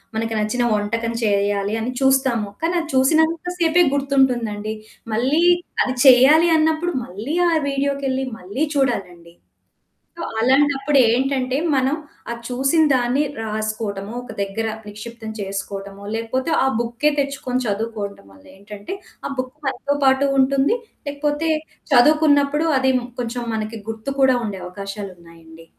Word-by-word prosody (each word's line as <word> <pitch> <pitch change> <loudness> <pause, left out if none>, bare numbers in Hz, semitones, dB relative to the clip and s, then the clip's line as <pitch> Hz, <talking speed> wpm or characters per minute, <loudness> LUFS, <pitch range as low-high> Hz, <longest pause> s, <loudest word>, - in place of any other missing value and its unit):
మనకు 225 0 -2
నచ్చిన 215 +3 0
వంటకం 230 +3 -2
చేయాలి 200 -1 +1
అని 245 - -2
చూస్తాము. 265 -6 +2
కానీ 335 +2 0
అది 325 -1 -5
చూసినంత 320 +5 +3
సేపే 345 0 +4
గుర్తుంటుందండి. 250 -7 +1 0.4
మళ్ళీ 265 +8 +2 0.4
అది 255 - -1
చేయాలి 270 +6 +7
అన్నప్పుడు 320 +2 +1
మళ్ళీ 220 - -5
ఆ - - +1 0.2
వీడియోకెళ్ళి 275 -1 -1
మళ్ళీ 200 +12 -2
చూడాలండి. 180 -11 -2 0.8
సో - - -6 0.2
అలాంటప్పుడేంటంటే 265 0 +2 0.2
మనం 265 +2 +2 0.4
ఆ - - -1
చూసిన 270 +6 +2
దాన్ని 255 +3 +2 0.2
రాసుకోవటమో, 215 -1 -4
ఒక 245 - -9
దగ్గర 200 +3 -2 0.2
నిక్షిప్తం 220 +2 -8
చేసుకోవటమో 195 0 -6
లేకపోతే 255 +7 -2
ఆ - - +2
బుక్కే 240 +5 0
తెచ్చుకొని 270 -2 -2
చదువుకోవటం 205 - -4
వల్ల 95 - -19
ఏంటంటే 205 - -8 0.3
ఆ - - -6
బుక్కు 255 +2 -4
మనతో 285 +1 -1
పాటు 265 +1 +4
ఉంటుంది. 275 - +3 0.3
లేకపోతే 295 +2 -1 0.4
చదువుకున్నప్పుడు 295 +2 +4
అది 265 0 +3 0.3
కొంచెం 240 0 -4
మనకి 220 0 -4
గుర్తు 225 +4 -4
కూడా 260 -1 +5
ఉండే 195 -3 -5
అవకాశాలున్నాయండి. 175 -4 -9
245 Hz, 120 wpm, -21 LUFS, 210-280 Hz, 0.8 s, చేయాలి